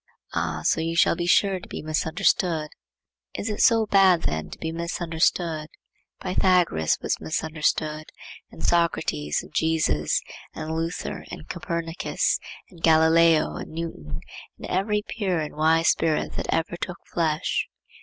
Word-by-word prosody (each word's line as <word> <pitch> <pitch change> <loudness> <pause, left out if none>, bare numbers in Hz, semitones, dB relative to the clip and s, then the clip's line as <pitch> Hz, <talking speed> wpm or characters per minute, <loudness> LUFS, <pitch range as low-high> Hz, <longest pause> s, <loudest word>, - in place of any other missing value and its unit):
—'Ah, 80 -1 -1
so - - +2
you 165 +1 -2
shall 170 - +4
be 175 0 -2
sure 195 +1 +3
to - - -12
be - - -6
misunderstood.'—Is 160 +4 -2
it 210 - -2
so 225 -2 +5
bad 190 -4 +5
then 80 0 -2
to - - -9
be 160 - -4
misunderstood? 165 -1 -1 0.5
Pythagoras 180 - +2
was - - 0
misunderstood, 155 - -1 0.4
and - - -11
Socrates, 75 - +1
and - - -15
Jesus, 155 - +1 0.4
and 160 +1 -4
Luther, 165 +2 -3
and 75 - -9
Copernicus, 170 - -1 0.3
and 170 -3 -16
Galileo, 160 0 +4
and - - -7
Newton, 80 - -6 0.4
and - - -8
every 210 +3 0
pure 190 -6 -1
and 150 -1 -4
wise 160 +2 +3
spirit 160 -2 +1
that - - -4
ever 165 +1 -1
took 175 0 -5 0.2
flesh. 160 -2 0
165 Hz, 135 wpm, -25 LUFS, 155-175 Hz, 0.5 s, so